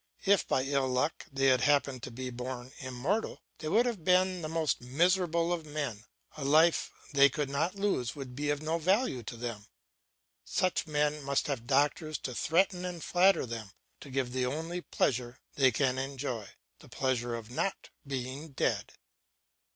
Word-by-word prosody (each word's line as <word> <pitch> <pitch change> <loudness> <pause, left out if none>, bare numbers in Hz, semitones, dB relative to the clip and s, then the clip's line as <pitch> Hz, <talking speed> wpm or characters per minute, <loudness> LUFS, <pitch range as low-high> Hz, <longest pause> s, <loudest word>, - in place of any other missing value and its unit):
If 200 -1 +4
by 130 - +2
ill 135 -1 +1
luck 130 +5 -1
they 135 0 0
had 130 -2 +5
happened 140 -2 +2
to - - -6
be 125 +2 -5
born 125 +1 -6
immortal, 135 - -2 0.2
they 155 - -5
would 225 +9 +4
have 230 -9 -2
been 185 +1 +3
the 155 - -4
most 160 -4 0
miserable 170 +5 +2
of 170 -2 -3
men; 145 -8 -4 0.3
a 150 - -6
life 160 +4 +4 0.2
they 140 0 +7
could 140 +1 -2
not 160 +7 0
lose 195 - 0
would 135 -3 -7
be 145 +2 -2
of 145 +1 -1
no 160 +2 0
value 185 - +2
to 115 +1 -7
them. 115 -3 -5 0.8
Such 170 - 0
men 150 0 +1
must 140 0 0
have 125 -5 -3
doctors 145 +3 +2
to 125 - -4
threaten 180 +7 +2
and 180 -3 -5
flatter 185 -1 +4
them, 115 -4 -6 0.3
to 140 - -11
give 130 -2 -1
them 130 - -1
the 125 - +2
only 165 +6 -3
pleasure 125 -5 -1
they 135 -2 +4
can 130 +2 +1
enjoy, 135 -5 -4 0.3
the - - -16
pleasure 120 -3 -1
of 115 0 -8
not 190 +9 -2 0.2
being 135 +3 -5
dead. - - -1
140 Hz, 175 wpm, -31 LUFS, 125-165 Hz, 0.8 s, they